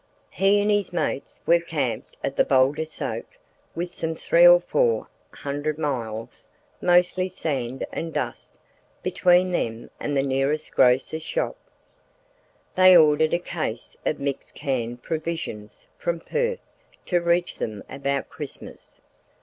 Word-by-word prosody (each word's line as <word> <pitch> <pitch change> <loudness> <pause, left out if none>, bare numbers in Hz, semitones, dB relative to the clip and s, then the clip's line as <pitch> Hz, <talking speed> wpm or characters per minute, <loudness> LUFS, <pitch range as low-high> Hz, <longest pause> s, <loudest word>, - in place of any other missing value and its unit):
He 195 +1 +3
and 205 +1 +2
his 205 -2 +1
mates 160 -5 -3
were 170 0 +5
camped 150 -7 -3
at 135 - -2
the - - +4
Boulder 135 +4 +3
Soak 325 - -6 0.4
with 175 +1 -3
some 160 -1 -3
three - - +5
or - - +9
four 485 -2 +1 0.2
hundred 145 +2 -3
miles—mostly 155 +8 -1
sand 135 -8 -3
and 165 0 -4
dust—between 180 +3 -1
them 115 -9 -3
and 145 -1 -1
the 135 - +2
nearest 135 +3 0
grocer's 130 +5 +3
shop. 160 - -2 1.2
They 185 -1 +8
ordered 155 0 +4
a - - +3
case 155 -10 -5
of 155 - -1
mixed 140 -1 -4
canned 120 -3 -3
provisions 160 -10 -5
from 170 -1 -1
Perth 475 - -2 0.4
to 175 -2 +1
reach 170 +1 +1
them 105 -3 -4
about 140 0 -2
Christmas. 150 -3 -10
155 Hz, 125 wpm, -24 LUFS, 135-175 Hz, 1.2 s, or